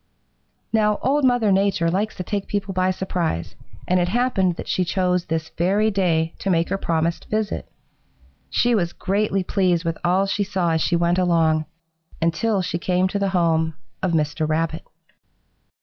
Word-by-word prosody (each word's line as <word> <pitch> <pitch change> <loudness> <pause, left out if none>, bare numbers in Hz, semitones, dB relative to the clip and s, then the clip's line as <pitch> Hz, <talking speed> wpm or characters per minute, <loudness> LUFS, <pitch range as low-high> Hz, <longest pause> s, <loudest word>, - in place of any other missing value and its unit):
"Now 210 -1 +3
Old 285 +3 +2
Mother 245 -5 +3
Nature 190 -4 +2
likes 205 +4 -1
to 185 - -4
take 200 +1 -3
people 200 -1 -2
by 185 0 +1
surprise, 180 - -2 0.3
and 180 0 +3
it 175 - +1
happened 195 -4 +1
that - - -7
she 185 - +1
chose 180 0 0
this 160 0 -3
very 205 +5 +2
day 165 -5 +1
to 195 - -2
make 170 -2 +2
her 195 - 0
promised 165 -1 -1
visit. 215 -1 -2 0.8
She 245 0 +2
was 175 -6 0
greatly 195 0 0
pleased 180 -3 +1
with 165 -1 -2
all 185 +3 +2
she 200 +1 0
saw 190 -4 0
as 160 0 +1
she 175 - +1
went 170 +1 +2
along, 165 -3 +2 0.5
until 185 +5 +1
she 175 -1 -2
came 180 +1 +1
to 200 - -2
the 200 -1 +1
home 165 -3 +1 0.3
of 185 -2 0
Mr. 155 0 0
Rabbit. 160 +1 -1
180 Hz, 170 wpm, -22 LUFS, 165-200 Hz, 0.8 s, Now